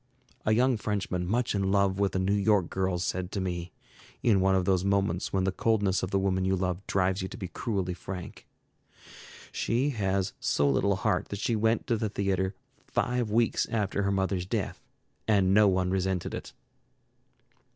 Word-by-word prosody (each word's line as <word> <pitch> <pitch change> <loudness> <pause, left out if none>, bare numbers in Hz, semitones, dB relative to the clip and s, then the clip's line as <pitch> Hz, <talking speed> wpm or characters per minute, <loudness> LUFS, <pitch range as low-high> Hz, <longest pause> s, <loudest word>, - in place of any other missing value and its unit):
A - - +4
young 125 +2 +3
Frenchman 100 -4 -2
much 120 +5 0
in 100 -2 0
love 100 -1 +2
with 100 -1 +1
a - - +3
New 95 +2 +1
York 100 -3 +2
girl 95 -1 0
said 90 +1 -2
to 100 - -1
me, 90 -2 -3 0.5
in 105 -5 +4
one 95 0 +3
of 95 -1 +1
those 95 -1 +2
moments 100 -3 0
when 95 -1 +1
the 95 - +1
coldness 100 -2 +1
of 95 - -2
the 100 - +1
woman 95 -1 +1
you 95 0 +2
love 90 -1 -1
drives 95 0 +1
you 95 - -3
to - - -9
be 95 -5 -5
cruelly 95 -4 -2
frank: 90 0 -8 1.0
"She 125 +5 0
has 95 -4 -1
so 70 - +1
little 95 +9 +2
heart 90 -1 0
that 100 - -4
she 115 +3 0
went 110 +1 +1
to 115 - +1
the 110 0 -1
theatre 95 -1 -1 0.3
five 125 -2 0
weeks 115 +1 +2
after 105 -2 -1
her 100 0 +1
mother's 95 -2 -1
death, - - -3 0.5
and 100 -3 +3
no 105 +1 +6
one 90 -1 +1
resented 95 -1 -1
it." - - -6
95 Hz, 185 wpm, -28 LUFS, 95-105 Hz, 1.0 s, no